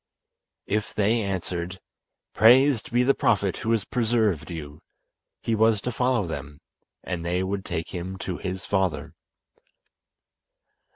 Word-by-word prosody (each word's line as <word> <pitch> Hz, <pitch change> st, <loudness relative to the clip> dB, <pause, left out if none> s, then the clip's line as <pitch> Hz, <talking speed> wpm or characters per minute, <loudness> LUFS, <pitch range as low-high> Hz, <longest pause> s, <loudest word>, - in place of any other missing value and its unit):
If 105 Hz, +1 st, -2 dB
they 110 Hz, +3 st, +2 dB
answered: 95 Hz, -2 st, -3 dB, 0.5 s
"Praised 130 Hz, +4 st, +5 dB
be 120 Hz, +1 st, +3 dB
the 135 Hz, +2 st, +4 dB
Prophet 100 Hz, -7 st, +1 dB
who 110 Hz, -, -4 dB
has 115 Hz, -4 st, +1 dB
preserved 110 Hz, -, 0 dB
you," 75 Hz, -3 st, -7 dB, 0.6 s
he 115 Hz, -, 0 dB
was 110 Hz, -1 st, +3 dB
to 125 Hz, -, -2 dB
follow 125 Hz, -3 st, +1 dB
them, 75 Hz, -3 st, -6 dB, 0.4 s
and 90 Hz, -2 st, -4 dB
they 90 Hz, +2 st, 0 dB
would 95 Hz, +1 st, -2 dB
take 80 Hz, -, -4 dB
him 95 Hz, +1 st, -5 dB
to 90 Hz, -, -3 dB
his 95 Hz, 0 st, -5 dB
father. 95 Hz, -3 st, -1 dB
100 Hz, 130 wpm, -25 LUFS, 90-115 Hz, 0.6 s, Praised